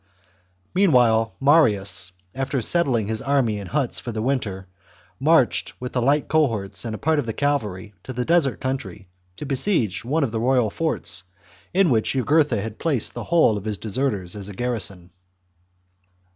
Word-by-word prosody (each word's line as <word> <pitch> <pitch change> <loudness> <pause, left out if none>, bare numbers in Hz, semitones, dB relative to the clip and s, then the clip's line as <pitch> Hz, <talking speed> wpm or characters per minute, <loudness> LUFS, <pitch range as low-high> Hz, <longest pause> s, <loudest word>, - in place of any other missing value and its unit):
CHAP. 95 -1 -37 0.4
Meanwhile 120 - +3
Marius, 100 - +2 0.2
after 135 +1 -2
settling 125 -4 +1
his 110 +1 -2
army 130 -6 +1
in 100 - -7
huts 140 0 0
for 120 - -6
the 110 -1 -3
winter, 110 -8 -2 0.5
marched 150 -2 +3
with 125 0 -6
the 125 - 0
light 140 +4 +2
cohorts 115 -11 0
and 110 -1 -3
a - - -6
part 155 +4 +1
of 130 - -3
the 110 - -2
cavalry 105 -9 -2
to - - -6
the 125 -1 -3
desert 165 -5 +2
country 130 -8 -5 0.3
to - - -6
besiege 135 - 0
one 145 +6 0
of 125 - -1
the 110 - -2
royal 125 -2 +2
forts, 155 - -2 0.5
in 185 -4 +3
which 110 -3 +1
Jugurtha 140 -3 +2
had 110 -1 -7
placed 145 -9 0
the - - -6
whole 160 -11 +3
of 100 - -13
his 105 -2 -2
deserters 105 -5 -2
as 100 -1 -6
a 100 - -9
garrison. 100 -7 -3
120 Hz, 170 wpm, -23 LUFS, 105-140 Hz, 0.5 s, Meanwhile